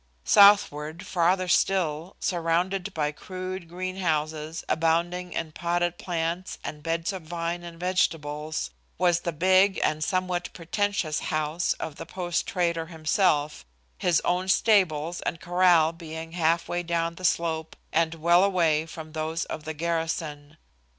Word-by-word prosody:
Southward, 170 -6 +5
farther 180 +1 +2
still, 175 -2 +1
surrounded 180 +3 0
by 150 -4 -1
crude 185 +2 -7
greenhouses 165 -4 -2
abounding 170 +2 0
in 160 -1 -3
potted 175 +1 -1
plants 170 +1 -3
and 150 +1 -6
beds 165 +4 -1
of 190 - -5
vine 170 +1 -3
and 170 -1 -10
vegetables, 155 -4 -1 0.3
was 175 -2 +3
the 170 - -3
big 185 +4 +4
and 155 0 +1
somewhat 185 0 -1
pretentious 175 -2 -1
house 155 +3 -1
of 155 -2 -7
the - - -8
post 175 -1 -2
trader 170 -3 0
himself, 155 - +1 0.4
his 175 -3 +3
own 180 +1 +1
stables 175 -6 +2
and 165 - -3
corral 175 -2 +4
being 165 -1 -8
half 165 0 +1
way 175 - -1
down 170 -1 -1
the 185 - -12
slope 160 -2 0 0.2
and 165 0 +2
well 170 +3 +4
away 165 -5 +2
from 155 -1 -9
those 160 +1 -2
of 155 - -7
the 160 - -3
garrison. 155 -2 -3
170 Hz, 135 wpm, -26 LUFS, 160-180 Hz, 0.4 s, Southward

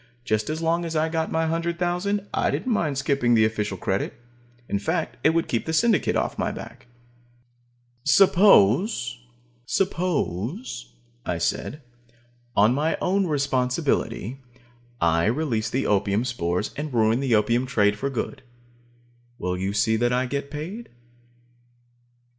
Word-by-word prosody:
Just 110 -3 0
as 160 +2 -3
long 165 +1 +1
as 165 -1 -4
I 160 +1 +1
got 160 0 -2
my 160 0 +1
hundred 170 +1 -1
thousand, 185 +4 -1
I - - +1
didn't 255 - -1
mind 150 -9 0
skipping 135 -4 +2
the 110 -1 +5
official 105 -3 -2
credit. 95 +2 -2 0.5
In 100 - -1
fact, 160 - -2
it - - +6
would 165 +1 +1
keep 115 - -2
the 160 - -1
Syndicate 225 +4 +2
off - - -1
my - - 0
back. - - -10 1.2
"Suppose," 150 - +4 2.0
I - - -2
said, 150 +1 -2 0.7
"on 105 +4 +5
my 150 +4 0
own 190 +1 +1
responsibility, 130 - -1 0.6
I 85 +1 +2
release 115 -3 0
the 130 +3 -1 0.4
spores 90 -7 -2
and 150 0 -4
ruin 115 0 +2
the 135 -4 +2
opium 115 +4 +2
trade 105 -5 +2
for 135 +7 -2
good. 130 - -4 1.0
Will 90 -4 -2
you 95 +2 -2
see 110 +2 +2
that 120 +2 +1
I 125 +1 +1
get 140 +2 -3
paid?" 170 +11 -6
135 Hz, 135 wpm, -24 LUFS, 110-165 Hz, 2.0 s, it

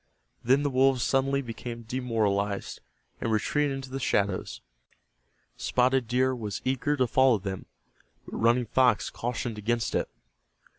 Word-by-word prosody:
Then 135 +4 +3
the 145 - 0
wolves 130 -1 +3
suddenly 135 +1 +1
became 115 0 -7
demoralized, 110 -5 -1 0.4
and 115 - -2
retreated 140 +6 +1
into 135 -1 -7
the 135 - -3
shadows. 100 -6 -1 1.0
Spotted 125 -1 +1
Deer 130 +2 +2
was 105 -4 -4
eager 135 +3 0
to 130 - +3
follow 130 0 +4
them, 95 -1 -6 0.6
but - - -8
Running 120 +2 +3
Fox 125 -1 +2
cautioned 120 -2 -4
against 115 +2 -1
it. - - 0
125 Hz, 135 wpm, -27 LUFS, 110-130 Hz, 1.0 s, follow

